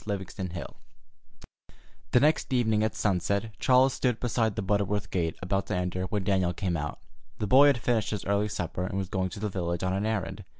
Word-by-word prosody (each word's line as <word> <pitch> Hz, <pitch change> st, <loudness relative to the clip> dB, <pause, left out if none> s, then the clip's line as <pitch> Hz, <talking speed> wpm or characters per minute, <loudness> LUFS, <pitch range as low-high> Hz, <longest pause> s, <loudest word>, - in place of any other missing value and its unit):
CHAPTER 100 Hz, -2 st, -2 dB
XXV 90 Hz, -4 st, -6 dB, 1.4 s
The 125 Hz, -, +5 dB
next 150 Hz, +1 st, +2 dB
evening 110 Hz, -4 st, +2 dB
at 110 Hz, -, -1 dB
sunset 100 Hz, +2 st, 0 dB
Charles 130 Hz, +1 st, +4 dB
stood 125 Hz, -3 st, 0 dB
beside 115 Hz, -3 st, 0 dB
the 110 Hz, -, -2 dB
Butterworth 100 Hz, +1 st, 0 dB
gate, 85 Hz, -3 st, -1 dB
about 95 Hz, +2 st, -1 dB
to -, -, -1 dB
enter, 90 Hz, +1 st, -2 dB
when 100 Hz, +1 st, -2 dB
Daniel 95 Hz, -2 st, +1 dB
came 90 Hz, 0 st, -2 dB
out. 75 Hz, -2 st, -3 dB, 0.4 s
The -, -, -2 dB
boy 135 Hz, +7 st, +7 dB
had 140 Hz, -3 st, +4 dB
finished 115 Hz, -3 st, 0 dB
his 105 Hz, -3 st, -4 dB
early 100 Hz, +1 st, +1 dB
supper, 90 Hz, -2 st, -3 dB
and 95 Hz, -, -4 dB
was 95 Hz, -2 st, -3 dB
going 95 Hz, -1 st, -1 dB
to 100 Hz, -, -8 dB
the 105 Hz, -, -1 dB
village 85 Hz, -2 st, -2 dB
on 95 Hz, 0 st, 0 dB
an 100 Hz, +3 st, -1 dB
errand. 110 Hz, -4 st, -3 dB
100 Hz, 205 wpm, -28 LUFS, 90-110 Hz, 1.4 s, boy